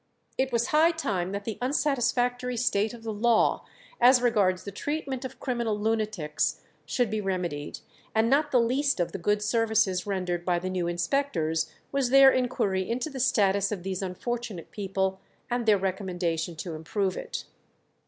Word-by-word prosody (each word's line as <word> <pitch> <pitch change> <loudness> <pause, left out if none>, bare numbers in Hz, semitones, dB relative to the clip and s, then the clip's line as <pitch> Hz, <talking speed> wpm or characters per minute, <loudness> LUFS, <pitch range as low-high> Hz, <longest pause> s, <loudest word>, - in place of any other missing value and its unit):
It 265 0 0
was 235 0 +1
high 315 +2 +5
time 195 - -2
that 200 0 -4
the 225 - -4
unsatisfactory 250 -2 0
state 220 -3 +1
of 230 - -14
the 220 -1 -3
law 230 +2 +2 0.4
as 250 +1 +7
regards 205 -7 +2
the 200 - -6
treatment 275 +3 -3
of 260 - -7
criminal 235 -5 -1
lunatics 215 -8 -1 0.3
should 245 -5 0
be 215 -1 -1
remedied, 180 -7 -3 0.3
and 220 +1 +3
not 290 +4 +3
the 255 - +4
least 260 +2 +1
of 175 - 0
the 195 - -5
good 210 +4 +1
services 210 -4 +1
rendered 180 -3 -2
by 175 0 +1
the 185 +2 -3
new 180 -2 -1
inspectors 170 - 0 0.2
was 275 -3 +1
their 270 +1 +8
inquiry 205 -8 0
into 250 +6 -2
the 270 - -6
status 200 -6 +2
of 195 -4 -4
these 190 0 -3
unfortunate 205 0 -4
people, 190 -1 -2 0.3
and 240 -1 -1
their 210 -2 +6
recommendation 180 -3 -2
to 165 +1 -6
improve 185 +5 -2
it. - - -5
210 Hz, 165 wpm, -27 LUFS, 185-245 Hz, 0.4 s, their